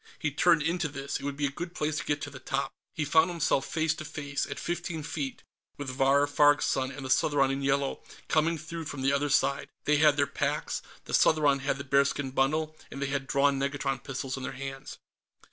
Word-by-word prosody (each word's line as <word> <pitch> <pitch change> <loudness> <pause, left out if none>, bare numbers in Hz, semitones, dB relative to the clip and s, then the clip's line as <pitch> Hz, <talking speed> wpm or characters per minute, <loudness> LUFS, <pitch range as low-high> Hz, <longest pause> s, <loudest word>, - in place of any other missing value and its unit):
He 150 - -1
turned 165 +2 +4
into 165 +1 0
this; 140 0 -4
it - - -11
would 140 -1 -3
be 145 - 0
a 140 - -1
good 175 +4 -6
place 155 0 -1
to - - -4
get 145 0 -1
to - - -5
the 130 - -9
top.... 135 +1 -2 0.2
He 155 - -1
found 160 +4 +4
himself 165 -5 +1
face 160 -1 +1
to 155 - -7
face, 145 -2 -3
at - - -6
fifteen 175 -2 -3
feet, 145 -4 -4 0.3
with 145 -2 -4
Vahr 135 +2 +4
Farg's 145 0 +4
son 130 -1 0
and 135 0 -7
the - - -5
Southron 140 -1 +3
in 135 +1 -2
yellow, 140 0 0 0.3
coming 160 +1 +2
through 160 +2 -6
from 145 -3 -5
the 135 +1 +3
other 145 +1 +1
side. 140 0 +1 0.2
They 150 0 +4
had 150 -1 +5
their 140 - +4
packs, - - -2 0.2
the - - -8
Southron 145 -3 +4
had 135 0 -1
the 140 - -5
bearskin 140 0 +1
bundle, 155 +4 +1
and 140 - -8
they 140 0 -1
had 135 -1 -2
drawn 140 0 +2
negatron 140 0 -2
pistols 135 -1 -4
in - - -6
their - - -4
hands. 135 0 -7
145 Hz, 225 wpm, -29 LUFS, 135-155 Hz, 0.3 s, had